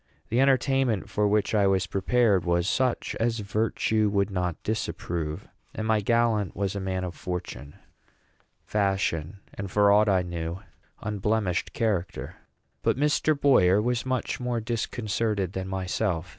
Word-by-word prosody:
The 115 - +1
entertainment 135 -4 +2
for 105 -1 +2
which 105 +1 +1
I 100 -2 +4
was 95 -1 +2
prepared 100 +1 +2
was 85 0 +1
such 130 +2 0
as 115 0 +1
virtue 110 +1 0
would 100 0 0
not 90 -3 -1
disapprove, 85 -7 -3 0.3
and 110 - -3
my 110 -1 +2
gallant 115 -3 +1
was 100 0 -2
a - - -2
man 95 -1 -2
of 90 -1 -4
fortune, 90 -7 -6 0.9
fashion, 95 -3 -1
and, 100 -1 -5
for 100 +1 +4
aught 105 +1 +5
I 95 -2 +3
knew, 85 -2 -4
of 95 +4 -10 0.4
unblemished 105 -3 -1
character. 105 -7 -2 0.4
But - - +1
Mr. 150 +1 +2
Boyer 105 -10 +5
was 120 +2 0
much 130 -1 -2
more 125 -1 -1
disconcerted 110 -3 -2
than 95 0 -4
myself. 95 -2 -2
100 Hz, 145 wpm, -26 LUFS, 95-115 Hz, 0.9 s, aught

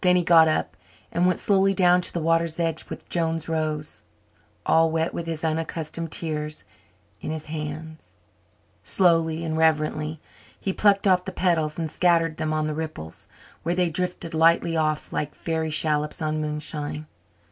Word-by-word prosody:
Then 180 -1 +5
he 180 - +3
got 165 -1 +6
up 80 - -1 0.4
and 175 +2 +2
went 180 - +2
slowly 195 -2 +2
down 180 -1 +5
to - - -1
the 170 - -2
water's 165 0 +1
edge 165 -2 -2
with - - -8
Joan's 165 -2 -1
rose, 155 -2 -2 0.6
all 165 0 +4
wet 160 +1 -1
with 170 - -4
his 165 -1 -4
unaccustomed 160 0 -3
tears, 150 -2 -2 0.6
in - - -5
his 155 -1 -3
hands. 155 - -7 0.6
Slowly 165 -3 +3
and 160 -1 -2
reverently 155 -1 +1 0.4
he 195 - -2
plucked 200 0 +3
off 185 -2 +3
the 190 - -4
petals 165 -5 0
and 165 -1 -1
scattered 165 -2 +2
them 155 - -1
on 155 0 0
the 155 - -2
ripples, 155 - -6 0.3
where 170 +2 -1
they 180 -2 +1
drifted 180 0 -3
lightly 165 +1 +3
off 155 -1 -1
like 150 0 -2
fairy 160 -1 -2
shallops 150 +1 0
on 155 -1 -1
moonshine. 150 0 -3
160 Hz, 165 wpm, -25 LUFS, 155-170 Hz, 0.6 s, got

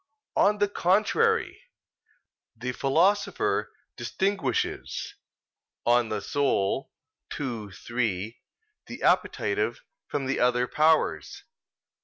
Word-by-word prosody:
On 210 +1 +4
the 205 0 +2
contrary, 215 - +2 1.0
The 125 +2 -3
Philosopher 170 - +1 0.2
distinguishes 195 +1 -2 0.7
(De 120 - +4
Anima 110 -4 +2 1.2
ii, 115 -8 -4
3) 110 0 -3 0.5
the - - -8
appetitive - - +1 0.3
from 140 -2 -2
the 135 +1 -1
other 125 0 +3
powers. 155 +3 +1
135 Hz, 80 wpm, -27 LUFS, 120-200 Hz, 1.2 s, On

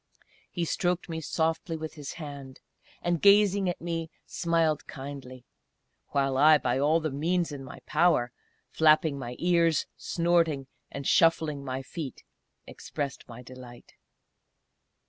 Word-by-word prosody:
He 175 -2 -2
stroked 175 +2 -1
me 160 -1 -4
softly 165 +1 -1
with 160 0 -6
his 145 -3 -7
hand, 140 -4 -9 0.4
and 175 -2 0
gazing 200 -1 +5
at 175 - -3
me 165 -1 -3 0.2
smiled 165 -3 0
kindly; 135 -3 -9 0.6
while 135 -1 0
I 155 +2 +7
by 125 -2 -1
all 150 +4 +3
the 155 -2 -3
means 165 +4 0
in 140 -2 -7
my 135 - -11
power 150 -6 +2 0.4
flapping 155 -2 +3
my 125 -1 -6
ears 170 -3 +2
snorting 170 -5 +1 0.2
and 140 0 -7
shuffling 160 -3 +3
my 130 0 -4
feet, 145 -2 -7 0.4
expressed 140 -3 -6
my 120 +1 -10
delight. 125 -1 -13
155 Hz, 130 wpm, -28 LUFS, 135-170 Hz, 0.6 s, I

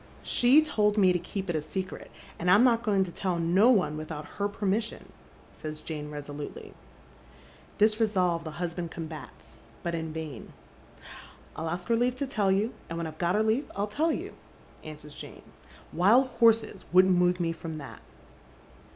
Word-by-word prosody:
" - - -23 0.2
She 265 +6 +7
told 210 -8 +1
me 185 -3 +5
to 180 - 0
keep 195 +2 -5
it 175 - -1
a 155 - 0
secret, 185 +5 -5 0.3
and 180 - 0
I'm 205 +6 +7
not 235 -2 +4
going 205 -4 +2
to 180 - -6
tell 180 0 -2
no 180 +8 +4
©ne 180 -9 +2
without 155 -1 -6
her 200 - -3
permission," 205 +2 -2 0.4
says 155 0 -7
Jane 150 -1 -6
resolutely. 145 0 -7 1.0
This 215 +1 +3
resolve 185 -6 +1
the 160 - -5
husband 175 -1 -3
combats, 160 -2 -9 0.3
but 170 - -2
in 160 -1 -3
vain. 155 -6 -7 0.5
" - - -16
I'll 160 - -4
arst 175 +2 -4
her 230 - +3
leaf 245 +2 +1
to 280 - -2
tell 210 -7 +1
you, 205 +5 +1 0.2
and 165 - -4
when 170 - -2
I've 155 0 -8
got 175 +2 +1
her 215 - +3
leaf 225 +6 +1
111 205 +1 -3
tell 320 +2 +2
you," - - -4 0.5
answers 150 -1 -10
Jane. - - -10 0.3
" - - -22
Wild 210 +10 +5
horses 225 -5 +2
wouldn't 185 +1 +6
move 180 0 +3
me 170 -1 0
from 165 -1 -6
that." 140 -3 -9
180 Hz, 185 wpm, -28 LUFS, 160-215 Hz, 1.0 s, She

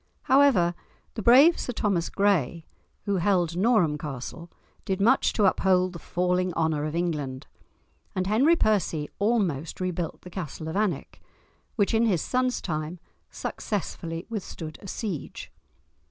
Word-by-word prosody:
However, 260 -11 +4 0.4
the 220 - -5
brave 270 - +6
Sir 250 - -3
Thomas 195 -7 0
Gray, 175 -5 +1 0.4
who 200 -1 0
held 175 -2 +1
Norham 180 -7 +2
Castle, 150 +4 -7 0.3
did 190 0 -2
much 240 +7 +4
to 210 - +2
uphold 185 -1 +2
the 170 - -8
falling 180 +1 0
honour 160 -2 0
of 155 +1 -4
England, 150 -7 -2 0.7
and 185 -1 0
Henry 250 - +4
Percy 180 - 0
almost 195 - 0
rebuilt 180 -2 -3
the 180 - -12
castle 160 -3 -6
of 160 - -4
Alnwick, 200 -8 -2 0.5
which 205 0 +1
in 225 +1 +3
his 180 -7 +1
son's 255 0 0
time 155 0 -3 0.3
successfully 170 -4 -4
withstood 180 -8 -6
a 195 - -10
siege. 190 - -5
185 Hz, 140 wpm, -26 LUFS, 165-210 Hz, 0.7 s, brave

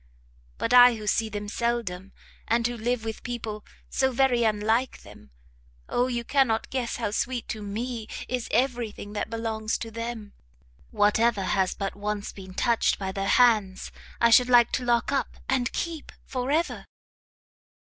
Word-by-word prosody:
but 230 - -1
I 245 -1 +8
who 215 -1 -8
see 220 +2 +1
them 205 0 -5
seldom, 205 -5 -2 0.4
and 230 0 +2
who 240 0 -1
live 235 0 -2
with 220 -1 -5
people 225 -4 -5 0.2
so 265 0 +1
very 250 -1 +2
unlike 220 +3 0
them 100 -9 -15 0.6
Oh 245 +1 +1
you 240 -2 -2
cannot 245 -4 +1
guess 255 -3 -2
how 225 -4 -2
sweet 240 +2 -2
to 215 - -4
me 220 +2 -4 0.2
is 250 -2 -3
every 245 -1 +1
thing 205 0 -10
that 210 - -3
belongs 225 -1 -2
to 225 - -7
them! 230 -2 -6 0.6
whatever 210 0 +2
has 190 0 0
but 195 -1 -4
once 205 0 -3
been 190 -1 -11
touched 235 -2 +2
by 190 -1 -3
their 195 0 -3
hands, 215 -7 +3 0.3
I 235 0 +4
should 250 +2 +6
like 240 -1 +6
to 255 - -1
lock 240 +1 +1
up, 275 - -1
and 255 -1 0
keep 330 -3 -4
for 255 0 -3
ever! 320 +4 -1
230 Hz, 165 wpm, -26 LUFS, 210-245 Hz, 0.6 s, I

